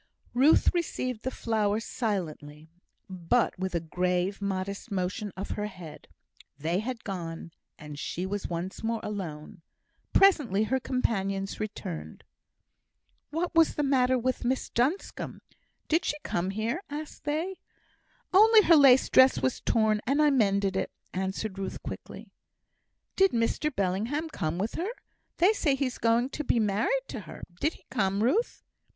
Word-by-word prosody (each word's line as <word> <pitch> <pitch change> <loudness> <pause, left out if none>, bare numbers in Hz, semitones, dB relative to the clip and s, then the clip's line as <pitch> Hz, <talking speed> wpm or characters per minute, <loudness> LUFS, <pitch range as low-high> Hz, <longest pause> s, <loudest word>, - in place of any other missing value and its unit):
Ruth 270 +6 +5
received 255 -9 -2
the 260 - -2
flower 215 -4 0
silently, 160 - -4 0.4
but 185 +4 0
with 185 -1 -2
a - - +2
grave, 180 +4 -1
modest 200 +2 -3
motion 195 +2 -2
of 195 - -5
her 210 0 -2
head. 180 -6 -11 0.5
They 165 +5 -1
had 235 +2 -4
gone, 170 -4 -6 0.3
and 150 -1 -9
she 180 +4 -3
was 200 +1 -3
once 175 +2 -5
more 225 0 -1
alone. 175 -6 -6 0.5
Presently, 290 - +4
her 260 +4 0
companions 195 -7 -1
returned. 80 - -6 1.1
"What 335 +4 -2
was 330 -1 +4
the 295 - 0
matter 260 -2 +3
with 255 +1 -1
Miss 255 +2 -1
Duncombe? 270 +11 -1 0.5
Did 325 +2 +2
she 295 - -1
come 175 +2 -1
here?" 220 - -2
asked 300 +1 -7
they. 325 +6 -2 0.7
"Only 435 +2 +7
her 340 - +6
lace 270 -3 +7
dress 260 0 +6
was 260 - -1
torn, 220 -2 +2
and 275 +3 +2
I 300 -1 +5
mended 200 -6 +2
it," - - -1 0.2
answered 190 +2 -3
Ruth, 190 -1 -4
quietly. - - -8 0.8
"Did 385 -1 +4
Mr 235 +6 +1
Bellingham 225 - -1
come 170 - -3
with 205 +5 -2
her? 360 +5 -2 0.5
They 375 +5 +5
say 290 -9 +1
he's 270 -2 -2
going 235 +3 +2
to 300 - -4
be 245 - +2
married 220 - +1
to - - -5
her; - - -10 0.2
did 315 - +1
he - - -19
come, 200 -3 +1
Ruth?" 405 - +1
220 Hz, 150 wpm, -28 LUFS, 190-275 Hz, 1.1 s, Only